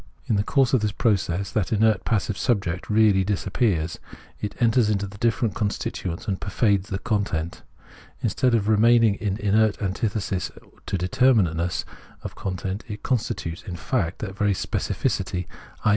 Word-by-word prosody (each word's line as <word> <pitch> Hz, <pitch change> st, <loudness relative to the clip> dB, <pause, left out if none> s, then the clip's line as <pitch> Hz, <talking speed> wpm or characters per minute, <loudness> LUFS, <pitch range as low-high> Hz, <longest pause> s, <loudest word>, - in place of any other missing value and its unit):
In 110 Hz, -, +1 dB
the 100 Hz, -, +2 dB
course 135 Hz, +2 st, +2 dB
of 130 Hz, -, +4 dB
this 105 Hz, -1 st, 0 dB
process 100 Hz, -4 st, 0 dB
that 105 Hz, -6 st, -1 dB
inert 110 Hz, -2 st, +2 dB
passive 105 Hz, -2 st, 0 dB
subject 95 Hz, -7 st, -1 dB
really 105 Hz, -3 st, +4 dB
disappears; 95 Hz, -4 st, 0 dB, 0.4 s
it 105 Hz, -, -5 dB
enters 115 Hz, -2 st, +3 dB
into 100 Hz, -1 st, 0 dB
the 100 Hz, +1 st, -10 dB
different 115 Hz, -1 st, +1 dB
constituents 100 Hz, -2 st, -3 dB
and 95 Hz, -3 st, -2 dB
pervades 100 Hz, -1 st, +1 dB
the 95 Hz, -, -1 dB
content; 100 Hz, -7 st, -2 dB, 0.6 s
in -, -, 0 dB
stead 125 Hz, -2 st, +2 dB
of 105 Hz, -2 st, 0 dB
remaining 115 Hz, 0 st, +5 dB
in 100 Hz, -1 st, -2 dB
inert 105 Hz, 0 st, +2 dB
antithesis 100 Hz, -1 st, -2 dB, 0.4 s
to -, -, -1 dB
determinateness 90 Hz, -4 st, +2 dB, 0.4 s
of -, -, -6 dB
content, 95 Hz, +2 st, -4 dB
it 105 Hz, -2 st, -7 dB
constitutes, 105 Hz, -9 st, -2 dB
in 90 Hz, -, -7 dB
fact, 90 Hz, -2 st, -1 dB
that 95 Hz, -3 st, -6 dB
very 105 Hz, 0 st, +2 dB
specificity, 90 Hz, -1 st, -2 dB, 0.4 s
i. -, -, +5 dB
100 Hz, 155 wpm, -24 LUFS, 95-110 Hz, 0.6 s, remaining